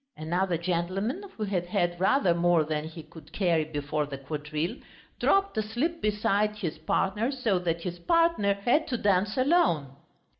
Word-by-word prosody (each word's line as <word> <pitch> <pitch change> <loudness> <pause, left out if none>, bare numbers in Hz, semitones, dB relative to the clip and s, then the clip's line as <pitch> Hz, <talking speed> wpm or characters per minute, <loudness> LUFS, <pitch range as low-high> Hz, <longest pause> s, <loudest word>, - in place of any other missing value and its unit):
Another 175 +3 0
gentleman, 185 - -2 0.2
who 215 - -2
had 185 -4 -1
had 175 -3 0
rather 190 -1 +3
more 170 -1 +3
than 155 0 -2
he 160 0 -9
could 155 -1 -15
carry 170 -5 +1
before 150 0 -2
the 140 -1 -6
quadrille, 150 - -4 0.4
dropped 395 -4 +2
asleep 240 +11 -2
beside 210 0 +1
his 170 -7 -4
partner 200 - 0
so 235 -9 0
that 170 -1 -2
his 175 0 -5
partner 330 - +2
had 245 +10 +1
to 250 - -1
dance 200 +1 +1
alone. 255 - +2
180 Hz, 155 wpm, -28 LUFS, 160-215 Hz, 0.4 s, rather